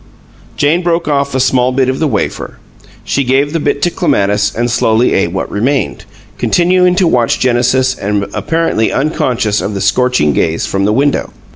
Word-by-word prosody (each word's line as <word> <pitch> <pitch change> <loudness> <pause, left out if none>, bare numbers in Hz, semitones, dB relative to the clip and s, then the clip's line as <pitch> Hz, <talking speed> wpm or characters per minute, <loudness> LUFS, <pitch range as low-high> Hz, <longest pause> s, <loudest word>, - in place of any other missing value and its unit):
Jane 155 +5 +2
broke 170 -2 -1
off 140 -2 -1
a - - +1
small 125 -1 +2
bit 130 0 +1
of 130 0 -2
the 160 - +1
wafer. - - -3 0.5
She 140 - -1
gave 135 +3 +1
the 165 - 0
bit 145 -1 -1
to 175 - +2
Clematis 105 - 0
and 120 +1 -1
slowly 115 +1 +2
ate 85 -3 0
what 95 - -4
remained, 110 - -1 0.3
continuing 180 +1 +2
to 190 0 +2
watch 120 -7 +1
Genesis 130 +1 +1
and 100 -3 -2
apparently 165 -9 0
unconscious 125 -7 -1
of 105 - -4
the - - -3
scorching 125 - +1
gaze 80 +4 0
from 100 0 -1
the 105 - +2
window. 140 +5 0
130 Hz, 175 wpm, -13 LUFS, 110-145 Hz, 0.5 s, Jane